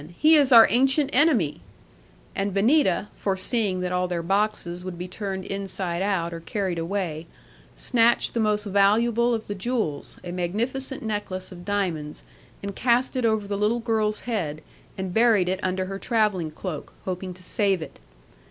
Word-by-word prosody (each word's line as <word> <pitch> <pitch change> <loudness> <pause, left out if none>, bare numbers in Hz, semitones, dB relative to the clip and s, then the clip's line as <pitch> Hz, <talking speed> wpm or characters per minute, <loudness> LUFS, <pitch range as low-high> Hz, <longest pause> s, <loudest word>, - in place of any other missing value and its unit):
He 310 +1 +5
is 285 -4 +5
our 230 -2 +10
ancient 270 +4 +3
enemy;" 250 - +3 0.7
and 195 0 -1
Benita 205 - +3
(foreseeing 195 0 0
that 180 0 -2
all 180 0 0
their 175 -2 -3
boxes 195 -2 -1
would 185 -2 -6
be 180 +1 -5
turned 190 0 -5
inside 190 -3 -3
out, 185 -4 0
or 165 - -5
carried 185 0 -3
away), 165 -2 -3 0.5
snatched 235 -1 +2
the 235 - -1
most 210 -1 +1
valuable 225 +4 +3
of 220 - -5
the 205 - -4
jewels, 205 - -3
a 175 - -6
magnificent 235 +10 -3
necklace 205 -4 -4
of 175 -1 -11
diamonds, 175 -7 -2 0.4
and 200 -1 -5
cast 250 +2 +2
it 255 -2 0
over 220 -2 +1
the 200 0 -2
little 215 +3 +1
girl's 220 -2 0
head, 160 -10 -3 0.3
and 190 -2 -4
buried 220 -4 +4
it 185 +1 -1
under 185 0 -1
her 195 +1 -5
travelling 210 -9 +1
cloak, 155 0 -6
hoping 185 0 -4
to 185 - -11
save 195 0 +1
it. - - -12
200 Hz, 165 wpm, -25 LUFS, 180-225 Hz, 0.7 s, our